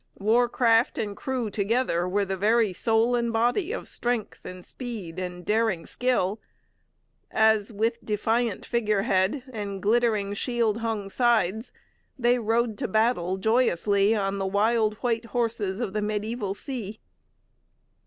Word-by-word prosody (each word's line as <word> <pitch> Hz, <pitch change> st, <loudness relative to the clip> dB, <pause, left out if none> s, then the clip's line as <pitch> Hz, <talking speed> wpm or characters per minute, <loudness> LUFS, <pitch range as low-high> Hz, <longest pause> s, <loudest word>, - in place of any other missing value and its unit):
War 235 Hz, +4 st, +3 dB
craft 230 Hz, -1 st, +3 dB
and 205 Hz, -2 st, -3 dB
crew 250 Hz, -4 st, -3 dB
together 200 Hz, -4 st, 0 dB
were 200 Hz, +2 st, +1 dB
the 190 Hz, 0 st, -2 dB
very 215 Hz, +1 st, +2 dB
soul 225 Hz, +5 st, +2 dB
and 235 Hz, -1 st, 0 dB
body 245 Hz, -, +1 dB
of -, -, -5 dB
strength 240 Hz, -3 st, -3 dB
and 185 Hz, -1 st, -9 dB
speed 210 Hz, -9 st, -7 dB
and 180 Hz, -1 st, -6 dB
daring 215 Hz, -6 st, +1 dB
skill, 225 Hz, -5 st, 0 dB, 0.9 s
as, 220 Hz, -1 st, +3 dB
with 225 Hz, +2 st, -1 dB
defiant 225 Hz, +1 st, -1 dB
figurehead 215 Hz, 0 st, +1 dB
and 200 Hz, -3 st, -4 dB
glittering, 215 Hz, -1 st, +1 dB
shield 230 Hz, 0 st, 0 dB
hung 225 Hz, -3 st, -2 dB
sides, 225 Hz, -1 st, +1 dB, 0.5 s
they 245 Hz, -1 st, +2 dB
rode 230 Hz, 0 st, 0 dB
to 255 Hz, -, -1 dB
battle 215 Hz, -4 st, +1 dB
joyously 205 Hz, -1 st, +2 dB
on 200 Hz, -1 st, -1 dB
the 195 Hz, -, -1 dB
wild 215 Hz, +2 st, +2 dB
white 230 Hz, -1 st, 0 dB
horses 225 Hz, -4 st, -1 dB
of 220 Hz, -6 st, -3 dB
the 210 Hz, -, -1 dB
mediaeval 210 Hz, 0 st, -2 dB
sea. 220 Hz, -5 st, -6 dB
220 Hz, 135 wpm, -26 LUFS, 200-235 Hz, 0.9 s, War